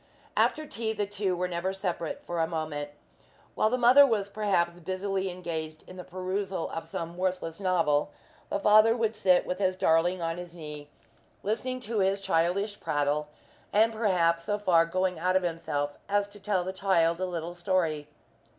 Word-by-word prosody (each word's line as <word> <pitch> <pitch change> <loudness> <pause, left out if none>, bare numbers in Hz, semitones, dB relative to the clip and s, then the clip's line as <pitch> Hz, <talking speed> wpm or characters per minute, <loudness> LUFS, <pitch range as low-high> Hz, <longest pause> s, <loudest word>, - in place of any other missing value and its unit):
After 310 - +2
tea, 225 -5 -3
the 210 -1 -1
two 200 -2 -1
were 180 +1 -1
never 180 +2 -2
separate 180 -4 -3
for 175 -1 -3
a 160 - +2
moment. 155 -3 -3 0.6
While 215 - +2
the 250 - +1
mother 250 +3 +8
was 215 -7 +1
perhaps 180 -5 0
busily 190 +2 -2
engaged 160 -3 -5
in 185 - -12
the 180 - -7
perusal 185 0 -3
of 165 0 -5
some 165 +1 -5
worthless 180 -2 -2
novel, 165 -7 +2 0.4
the - - 0
father 215 +3 +5
would 225 -1 0
sit 185 -4 +3
with 180 - -3
his 185 -2 +1
darling 175 +1 +2
on 165 0 -2
his 175 -1 -9
knee, 150 -3 -8 0.5
listening 255 +5 -2
to 225 -1 -2
his 195 +1 +2
childish 195 +3 0
prattle, 145 +1 0 0.4
and 225 +2 +4
perhaps 175 -6 +2
so 205 - 0
far 170 -5 +3
going 185 0 -1
out 185 +2 +1
of 190 - +3
himself 145 -4 -2
as 205 0 +2
to 205 0 -13
tell 195 -2 0
the 185 +1 -4
child 175 -3 +2
a - - +1
little 170 -1 -4
story. 170 -4 0
185 Hz, 180 wpm, -28 LUFS, 165-200 Hz, 0.6 s, mother